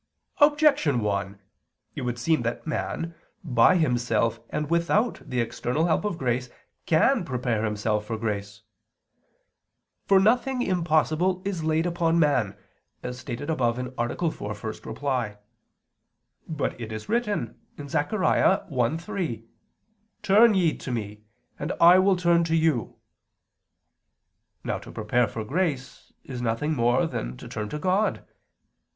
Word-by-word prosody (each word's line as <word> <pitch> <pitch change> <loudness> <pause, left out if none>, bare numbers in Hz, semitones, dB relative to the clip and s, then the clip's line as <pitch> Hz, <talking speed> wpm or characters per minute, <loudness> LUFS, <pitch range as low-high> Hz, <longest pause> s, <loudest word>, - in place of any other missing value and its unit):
Objection 290 - +4
1: 100 -1 -2 0.6
It - - -4
would 120 -1 -2
seem 155 +5 +1
that 115 0 -3
man, 165 +1 -3 0.3
by 130 +2 +4
himself 120 -7 +1
and 150 - -2
without 170 +8 +1
the 125 - -3
external 125 +6 -1
help 165 +2 +1
of 205 -5 -2
grace, 125 -2 -1 0.4
can 190 +8 +3
prepare 125 -7 -1
himself 105 0 -1
for 115 - -3
grace. 105 -1 -4 1.4
For 195 -1 +6
nothing 245 +5 +2
impossible 175 0 +1
is 190 -5 -2
laid 160 +1 +1
upon 170 -1 +1
man, 145 - +2 0.5
as 125 0 -5
stated 130 +4 -5
above 120 -6 0
(A. 125 0 -4 0.4
4, 105 - -6
ad 110 +4 -7
1). 125 -7 -1 1.1
But 150 -5 -3
it 110 -1 -6
is 110 0 -6
written 215 -2 -1 0.3
(Zech. 145 +1 -1
1:3): 165 - 0 0.8
"Turn 215 +3 +6
ye 175 -4 +2
to 130 - -6
Me... 105 -3 -4 0.4
and 150 +5 -2
I 175 +2 +8
will 190 0 +4
turn 170 -1 +3
to 165 0 0
you." 160 -7 +1 1.7
Now - - -2
to - - -12
prepare 115 +2 +1
for 110 +1 -5
grace 140 0 -3
is 125 -3 -6
nothing 120 +7 -1
more 120 +5 +2
than - - -4
to - - -10
turn 105 -1 -5
to 150 - -4
God. 190 +6 0
145 Hz, 135 wpm, -26 LUFS, 115-175 Hz, 1.7 s, I